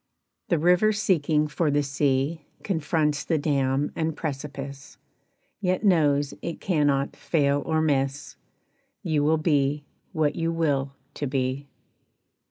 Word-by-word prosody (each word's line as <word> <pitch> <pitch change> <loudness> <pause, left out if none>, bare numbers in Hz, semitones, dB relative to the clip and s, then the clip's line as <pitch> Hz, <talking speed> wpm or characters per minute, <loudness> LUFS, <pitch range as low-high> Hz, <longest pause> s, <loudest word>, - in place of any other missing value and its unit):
The 170 - +3
river 180 +7 +4
seeking 155 -7 +1
for 150 +2 0
the 145 0 +2
sea 140 +2 0 0.2
Confronts 155 -4 0
the 165 - 0
dam 140 -2 0
and 160 -1 -2
precipice, 140 -2 -6 0.6
Yet 185 0 0
knows 145 -7 +3
it 170 - -5
cannot 145 -6 +1
fail 145 -3 +1
or 160 -1 +1
miss; 140 -1 -1 0.7
You 155 -3 +1
will 160 +2 +3
be 145 -2 +1 0.3
what 155 -5 0
you 165 0 -1
will 140 -4 0 0.2
to 145 - -3
be! 130 +1 -2
150 Hz, 125 wpm, -25 LUFS, 140-160 Hz, 0.7 s, river